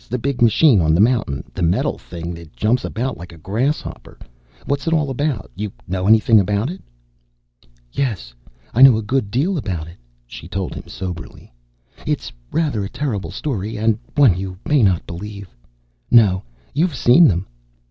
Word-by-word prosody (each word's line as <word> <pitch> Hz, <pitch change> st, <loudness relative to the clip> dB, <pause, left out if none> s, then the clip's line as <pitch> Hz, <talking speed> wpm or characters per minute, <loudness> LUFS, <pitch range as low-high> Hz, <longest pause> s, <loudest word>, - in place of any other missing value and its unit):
The 125 Hz, -, -1 dB
big 130 Hz, +1 st, -3 dB
machine 115 Hz, -, +5 dB
on 80 Hz, 0 st, +3 dB
the -, -, +1 dB
mountain? 110 Hz, -, +2 dB
The 95 Hz, -, -5 dB
metal 85 Hz, +1 st, +1 dB
thing 85 Hz, 0 st, -7 dB
that 85 Hz, -5 st, -12 dB
jumps 115 Hz, -, +1 dB
about 125 Hz, -1 st, -3 dB
like 85 Hz, -, -9 dB
a 85 Hz, -, -13 dB
grasshopper? 115 Hz, -, -3 dB, 0.5 s
What's 140 Hz, +3 st, -2 dB
it 165 Hz, -, +2 dB
all 150 Hz, -4 st, +1 dB
about? 135 Hz, -5 st, -2 dB
You 105 Hz, +1 st, -4 dB, 0.2 s
know 95 Hz, +1 st, -2 dB
anything 110 Hz, 0 st, +6 dB
about 105 Hz, -, 0 dB
it?" 185 Hz, -, -9 dB, 1.1 s
"Yes, 95 Hz, -, -3 dB, 0.4 s
I 120 Hz, -, +2 dB
know 135 Hz, -4 st, +9 dB
a 110 Hz, -, -3 dB
good 115 Hz, -1 st, -1 dB
deal 155 Hz, -, 0 dB
about 85 Hz, -, -4 dB
it," 85 Hz, -, -13 dB, 0.3 s
she -, -, -10 dB
told 95 Hz, -2 st, -3 dB
him -, -, -9 dB
soberly. 90 Hz, -9 st, -8 dB, 0.5 s
"It's -, -, -2 dB, 0.2 s
rather 150 Hz, -10 st, 0 dB
a 95 Hz, -, -4 dB
terrible 120 Hz, -, -3 dB
story. 110 Hz, -, -4 dB
And 110 Hz, +1 st, +1 dB, 0.2 s
one 135 Hz, -11 st, +5 dB
you 95 Hz, 0 st, -5 dB
may 150 Hz, -3 st, +3 dB
not 95 Hz, -5 st, +2 dB
believe 100 Hz, -2 st, -8 dB, 0.5 s
no, 100 Hz, -6 st, +5 dB, 0.3 s
you've 165 Hz, 0 st, +1 dB
seen 130 Hz, +8 st, +6 dB
them! 90 Hz, -1 st, 0 dB
105 Hz, 170 wpm, -20 LUFS, 90-130 Hz, 1.1 s, know